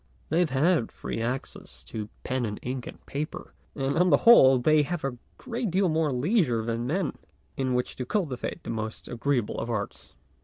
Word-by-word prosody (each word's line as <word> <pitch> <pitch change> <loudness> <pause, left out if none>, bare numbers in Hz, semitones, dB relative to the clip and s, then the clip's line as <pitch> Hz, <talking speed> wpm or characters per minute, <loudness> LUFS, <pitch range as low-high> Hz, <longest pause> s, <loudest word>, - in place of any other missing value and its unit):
They 160 - +2
have 175 -3 +3
had 140 0 +2
free - - -5
access 115 - -4
to 105 - -6
pen 130 0 -1
and 105 -2 -3
ink 125 -1 -4
and - - -11
paper, 150 +3 -5 0.2
and 140 +3 0
on 180 +1 +5
the 145 - +3
whole 135 - +9
they 155 +5 +4
have 165 +3 -3
had 135 -2 -1
a - - -12 0.2
great 235 -3 -3
deal 185 +1 +2
more 160 -1 +2
leisure 125 - +1
than 115 +1 -2
men 175 +3 0 0.4
in 130 -2 0
which 125 - -1
to 125 - -3
cultivate 145 - -2
the - - -4
most 110 -1 -4
agreeable 120 -2 -1
of 115 - -4
arts. 105 -3 -4
135 Hz, 195 wpm, -27 LUFS, 120-165 Hz, 0.4 s, whole